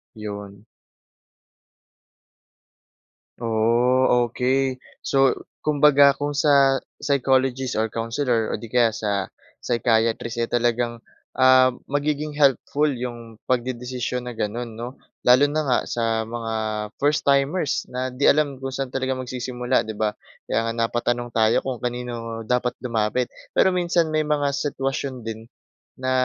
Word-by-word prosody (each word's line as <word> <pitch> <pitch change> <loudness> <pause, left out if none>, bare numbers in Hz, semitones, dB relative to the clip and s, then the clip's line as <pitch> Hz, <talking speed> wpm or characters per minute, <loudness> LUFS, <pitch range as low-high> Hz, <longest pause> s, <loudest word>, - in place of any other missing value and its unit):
'Yon. 100 -1 -8 2.7
Ooh, 120 +2 +2
okey. 130 +2 0 0.2
So, 135 -1 +1 0.2
kumbaga 145 -1 +5
kung 145 0 -2
sa, 140 -2 +4 0.2
psychologist 135 -2 +1
or 110 - +1
counselor 115 +1 -1
o - - -1
'di 115 - -8
kaya 120 -2 +3
sa 100 -4 -2 0.3
psychiatrist 115 0 +1
eh, 115 - -1
talagang, 120 0 0 0.4
ah, 130 0 +6 0.2
magiging 150 +1 -1
helpful 145 +1 +2
'yong 120 -3 -7
pagdedesisyon 125 0 -2
na 125 - -5
gano'n, 115 +1 -4
'no. 120 +2 -5 0.3
Lalo 125 +3 +6
na 155 +2 -1
nga 130 -4 +2
sa 115 -1 -1
mga 115 -1 -4 0.5
first 145 +1 +2
timers 140 +3 +1
na 130 +1 -3
'di 130 +3 -1
alam 145 -2 +3
kung 135 -1 -5
saan 135 -1 -3
talaga 130 0 -1
magsisimula, 125 -1 -1
'di 110 - -5
ba. 110 -1 +1 0.4
Kaya 115 - 0
nga - - -2
napatanong 120 +1 -1
tayo 110 -1 +3
kung 130 -3 -3
kanino 120 -2 -4
dapat 125 +1 0
lumapit. 115 +1 0 0.2
Pero 190 - +4
minsan 170 -2 +1
may 155 0 +1
mga 145 -2 +1
sitwasyon 135 -3 -3
din 115 0 -6 0.5
na, 130 0 -2
125 Hz, 130 wpm, -23 LUFS, 115-135 Hz, 2.7 s, ah